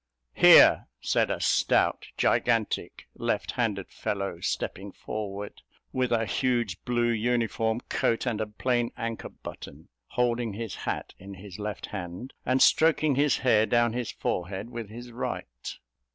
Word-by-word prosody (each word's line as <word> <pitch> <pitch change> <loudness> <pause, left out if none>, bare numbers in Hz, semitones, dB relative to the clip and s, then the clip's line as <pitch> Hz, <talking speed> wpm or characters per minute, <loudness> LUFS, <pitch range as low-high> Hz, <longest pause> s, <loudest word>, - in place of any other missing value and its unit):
"Here," - - +7
said - - +1
a - - -1
stout, - - +2
gigantic, 115 -3 0
left - - -1
handed - - -2
fellow, 100 -1 -3
stepping 100 +1 -3
forward, 105 -1 -6 0.3
with 130 -1 0
a 115 -1 +2
huge 120 -7 0
blue 120 -1 +1
uniform 115 0 0
coat 115 - 0
and 115 -4 -1
a 110 - -1
plain 120 +2 0
anchor 115 -1 -4
button, - - -11 0.2
holding 120 -2 0
his 110 -1 -5
hat - - -4
in 95 +1 -9
his 95 +1 -10
left 105 0 -4
hand, 95 +5 -7
and 130 +1 +4
stroking 155 -2 +4
his 140 +2 +3
hair 110 -3 +5
down 120 -1 +3
his 120 -2 -3
forehead 95 +5 -3
with 115 -4 -6
his 120 +2 -9
right. 60 - -5
115 Hz, 140 wpm, -27 LUFS, 105-120 Hz, 0.3 s, Here